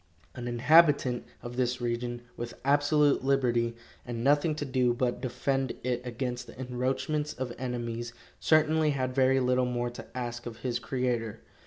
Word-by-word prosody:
An 120 Hz, -1 st, -6 dB
inhabitant 135 Hz, 0 st, +4 dB, 0.2 s
of 120 Hz, +1 st, -7 dB
this 125 Hz, 0 st, 0 dB
region, 120 Hz, 0 st, -3 dB
with 120 Hz, 0 st, -6 dB
absolute 145 Hz, 0 st, +3 dB
liberty, 120 Hz, -4 st, +1 dB, 0.3 s
and 120 Hz, -1 st, -5 dB
nothing 145 Hz, +3 st, +3 dB
to 150 Hz, -, -3 dB
do 125 Hz, -2 st, +1 dB
but 125 Hz, -1 st, -1 dB
defend 135 Hz, +1 st, -1 dB
it 125 Hz, -1 st, -1 dB
against 125 Hz, 0 st, -4 dB
the -, -, -13 dB
encroachments 130 Hz, +4 st, -1 dB
of 125 Hz, -2 st, -4 dB
enemies, 120 Hz, -2 st, -3 dB, 0.3 s
certainly 155 Hz, 0 st, +3 dB
had 130 Hz, -1 st, -1 dB
very 135 Hz, 0 st, +4 dB
little 125 Hz, 0 st, +2 dB
more 120 Hz, 0 st, -1 dB
to 120 Hz, -, -9 dB
ask 120 Hz, -1 st, -4 dB
of 115 Hz, -2 st, -7 dB
his 120 Hz, -1 st, 0 dB
Creator. 120 Hz, -3 st, -2 dB
125 Hz, 155 wpm, -29 LUFS, 120-135 Hz, 0.3 s, inhabitant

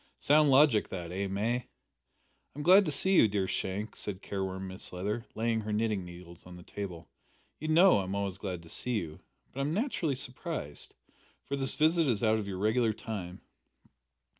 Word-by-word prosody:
Sound 150 Hz, 0 st, +4 dB
logic 135 Hz, -5 st, +5 dB
that, 85 Hz, -2 st, -6 dB
eh, 100 Hz, +2 st, -2 dB
May?" 110 Hz, +6 st, -1 dB, 0.9 s
"I'm 145 Hz, -, -5 dB
glad 190 Hz, +4 st, +7 dB
to 155 Hz, -, -1 dB
see 190 Hz, +7 st, +2 dB
you, 145 Hz, -, +7 dB
dear 100 Hz, -2 st, -1 dB
Shank," 100 Hz, +4 st, -3 dB
said 100 Hz, -2 st, -5 dB
careworn 95 Hz, -1 st, -4 dB
Mrs 95 Hz, 0 st, -5 dB
Leather, 105 Hz, +6 st, -3 dB
laying 115 Hz, 0 st, 0 dB
her 105 Hz, 0 st, -5 dB
knitting 105 Hz, -2 st, 0 dB
needles 85 Hz, -1 st, -12 dB
on 90 Hz, -, -10 dB
the 90 Hz, -, -12 dB
table; 90 Hz, -5 st, -7 dB, 0.5 s
"you 155 Hz, -, -4 dB
know 170 Hz, -, +6 dB
I'm 95 Hz, 0 st, -3 dB
always 100 Hz, -2 st, -2 dB
glad 90 Hz, -4 st, -5 dB
to 80 Hz, -, -13 dB
see 125 Hz, +7 st, -2 dB
you, 80 Hz, -6 st, -5 dB, 0.3 s
but 135 Hz, -, -7 dB
I'm 145 Hz, +4 st, -1 dB
naturally 195 Hz, -, 0 dB
surprised, 125 Hz, -, -5 dB, 0.5 s
for 140 Hz, -, -2 dB
this 135 Hz, -1 st, -2 dB
visit 160 Hz, +1 st, +3 dB
is 120 Hz, -3 st, 0 dB
out 110 Hz, 0 st, +3 dB
of 105 Hz, -, -5 dB
your 95 Hz, -2 st, -4 dB
regular 110 Hz, +3 st, +2 dB
time." 95 Hz, -5 st, -6 dB
105 Hz, 185 wpm, -30 LUFS, 95-135 Hz, 0.9 s, glad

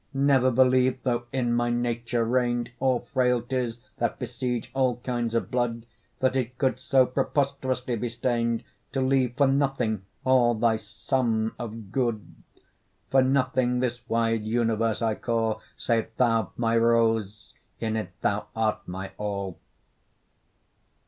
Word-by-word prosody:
Never 135 Hz, -2 st, +4 dB
believe 130 Hz, +1 st, +4 dB
though 120 Hz, -2 st, 0 dB
in 125 Hz, -3 st, 0 dB
my 120 Hz, 0 st, +1 dB
nature 120 Hz, -1 st, 0 dB
reign'd, 120 Hz, 0 st, 0 dB
All 130 Hz, -2 st, +2 dB
frailties 125 Hz, -1 st, 0 dB, 0.2 s
that -, -, -1 dB
besiege 125 Hz, 0 st, -3 dB
all 130 Hz, -3 st, +1 dB
kinds 120 Hz, -2 st, -2 dB
of 115 Hz, -, -1 dB
blood, 120 Hz, -2 st, -1 dB, 0.3 s
That 130 Hz, 0 st, +1 dB
it 125 Hz, -1 st, -2 dB
could 130 Hz, -2 st, +1 dB
so 130 Hz, 0 st, +4 dB
preposterously 130 Hz, -1 st, -1 dB
be 120 Hz, +2 st, -2 dB
stain'd, 115 Hz, -1 st, -1 dB, 0.3 s
To 135 Hz, -, 0 dB
leave 130 Hz, -2 st, +1 dB
for 140 Hz, -, +5 dB
nothing 135 Hz, -6 st, +1 dB, 0.2 s
all 125 Hz, -2 st, +4 dB
thy 110 Hz, 0 st, +2 dB
sum 110 Hz, +1 st, -1 dB
of 110 Hz, -4 st, -7 dB
good; 120 Hz, -5 st, 0 dB, 0.9 s
For 135 Hz, -, +6 dB
nothing 130 Hz, -2 st, +2 dB
this 120 Hz, -1 st, -1 dB
wide 115 Hz, -1 st, +1 dB
universe 115 Hz, 0 st, 0 dB
I 110 Hz, -1 st, +2 dB
call, 115 Hz, -1 st, -1 dB, 0.2 s
Save 115 Hz, -2 st, 0 dB
thou, 115 Hz, -5 st, +2 dB
my 115 Hz, -1 st, +1 dB
rose, 115 Hz, -3 st, +1 dB, 0.3 s
in 110 Hz, -1 st, -1 dB
it 110 Hz, -5 st, -2 dB
thou 100 Hz, +1 st, 0 dB
art 110 Hz, -1 st, -1 dB
my 95 Hz, +2 st, -6 dB
all. 100 Hz, -3 st, -3 dB
120 Hz, 135 wpm, -26 LUFS, 115-130 Hz, 0.9 s, For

